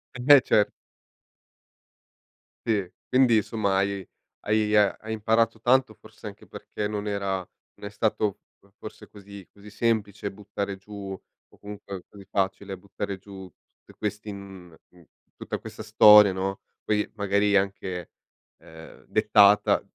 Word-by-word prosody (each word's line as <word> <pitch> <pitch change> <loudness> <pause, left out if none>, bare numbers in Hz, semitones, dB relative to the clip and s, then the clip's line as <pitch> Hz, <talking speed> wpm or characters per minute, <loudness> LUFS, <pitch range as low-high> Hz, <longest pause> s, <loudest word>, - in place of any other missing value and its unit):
E - - -8
invece. 125 -5 +5 2.0
Si, 100 -5 0 0.2
quindi, 125 -3 +4
insomma 105 -2 0
hai 100 -1 -1 0.4
hai 105 0 +1
e - - +5 0.2
hai 110 - -7
imparato 110 +1 +1
tanto, 125 -1 +2
forse 110 0 -13
anche 100 -1 -11
perché 105 - -6
non 105 0 -4
era 100 -1 -2 0.4
non 100 - -9
è - - -7
stato 105 -1 -1 0.2
fo 100 0 -28
forse 110 - -11
così 100 -2 -12
così 100 +1 -15
semplice 105 -2 -1
buttare 100 0 -5
giù 100 0 -9 0.4
o - - -23
comunque 100 -2 -9
così 100 -1 -14
facile, 95 0 -2
buttare 100 +1 -6
giù 95 -2 -12 0.3
te - - -18
questi 105 0 -4
in 95 -4 -10 0.2
uhm, 90 -2 -20 0.3
tutta - - -5
questa - - -9
storia, 105 -2 +7
no, 95 +1 -4 0.2
poi 105 -1 0
magari 100 0 +2
anche, 95 -2 -3 0.5
ehm, 80 -1 -14
dettata 105 0 +4
100 Hz, 135 wpm, -25 LUFS, 95-105 Hz, 2.0 s, storia